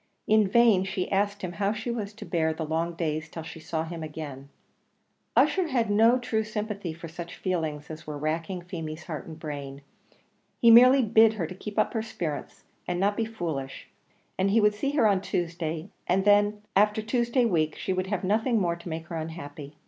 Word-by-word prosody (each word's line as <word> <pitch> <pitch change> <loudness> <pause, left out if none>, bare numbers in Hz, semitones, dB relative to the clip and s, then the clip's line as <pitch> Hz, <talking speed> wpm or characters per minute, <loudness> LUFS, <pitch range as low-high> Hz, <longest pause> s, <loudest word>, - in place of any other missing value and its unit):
In 215 -1 +4
vain 220 -2 +5
she 190 -1 -3
asked 200 +1 0
him 180 - -3
how 200 +3 0
she 220 +2 -4
was 215 -4 -3
to - - -9
bear 160 -3 0
the 160 - -3
long 165 +2 -1
days 155 -2 -2
till 165 +1 -7
she 160 - -9
saw 160 0 -3
him 165 0 -6
again; 150 -3 -7 0.9
Ussher 370 -3 +4
had 235 -7 0
no 225 +4 +5
true 225 -3 -1
sympathy 210 -4 -4
for 165 +1 -8
such 170 +1 -8
feelings 160 -5 -2
as 155 +1 -9
were 150 -1 -4
racking 165 +4 -3
Feemy's 165 -3 -6
heart 155 -5 -6
and 160 -1 -8
brain; 140 -3 -7 0.8
he 235 - +7
merely 255 +3 +8
bid 225 0 +5
her 195 -6 -2
keep 195 +5 -8
up 215 - +2
her 225 - 0
spirits, 165 -9 -5 0.2
and 175 0 -1
not 200 +2 +2
be 225 - 0
foolish; 160 -11 -5 0.5
that 190 +1 +3
he 220 +3 +4
would 210 -1 +4
see 210 +7 -2
her 285 -6 +3
on 195 -2 +2
Tuesday, 170 -1 -3 0.2
and 190 +2 +2
that 205 0 +5 0.2
after 210 +2 +3
Tuesday 240 +2 +1
week 155 -7 +1
she 190 - -2
would 185 0 -2
have 200 -2 -2
nothing 220 +4 +2
more 170 -3 +1
to 170 +1 -9
make 160 0 -5
her 170 - -7
unhappy. 150 -3 -7
185 Hz, 200 wpm, -27 LUFS, 160-215 Hz, 0.9 s, merely